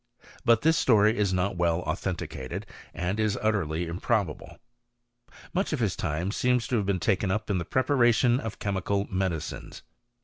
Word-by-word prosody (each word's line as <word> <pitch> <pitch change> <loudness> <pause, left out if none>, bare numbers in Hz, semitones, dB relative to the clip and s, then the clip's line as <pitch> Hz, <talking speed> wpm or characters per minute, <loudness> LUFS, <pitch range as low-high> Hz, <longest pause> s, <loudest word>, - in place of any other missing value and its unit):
But 115 -1 +4
this 160 0 +4
story 110 -2 +4
is 100 -2 +1
not 95 0 0
well 85 0 +1
authenticated, 85 -6 -4 0.3
and 90 +4 -2
is 110 -2 +1
utterly 90 -7 0
improbable.' 90 0 -2 1.0
Much 185 -2 0
of 150 - -1
his 105 -6 0
time 85 +3 -2
seems 125 +1 +1
to 125 - +2
have 100 -3 -1
been 100 -2 +1
taken 95 +1 +1
up 105 +2 -1
in 95 - +1
the 85 - -4
preparation 125 - +3
of 110 -4 -5
chemical 100 0 -1
medicines. 95 -5 -3
100 Hz, 160 wpm, -27 LUFS, 90-115 Hz, 1.0 s, But